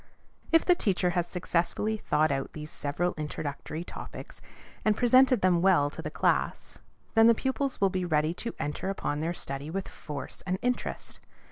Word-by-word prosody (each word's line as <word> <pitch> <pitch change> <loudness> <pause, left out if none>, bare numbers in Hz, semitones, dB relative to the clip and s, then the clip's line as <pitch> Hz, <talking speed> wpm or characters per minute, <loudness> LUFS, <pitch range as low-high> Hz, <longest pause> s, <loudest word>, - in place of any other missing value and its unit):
If 330 -1 +5
the 360 - +6
teacher 185 - +1
has 175 -1 0
successfully 180 +4 0
thought 155 -7 +1
out 135 -1 -2
these 150 0 -7
several 155 +5 -1
introductory 150 +1 -4
topics, - - -9 0.4
and 215 -1 +2
presented 255 -1 +5
them 180 -2 +3
well 175 -7 +4
to - - -7
the - - -4
class, - - 0 0.3
then 225 0 +7
the 230 - +6
pupils 265 +2 -1
will 195 -1 +3
be 185 -1 -1
ready 155 -2 +1
to 230 +6 -5
enter 150 +6 -3
upon 150 -6 -2
their 165 +3 -2
study 140 0 -5
with 195 +3 -3
force 145 -2 -7
and 185 +1 0
interest. 250 0 -2
175 Hz, 170 wpm, -29 LUFS, 150-215 Hz, 0.4 s, then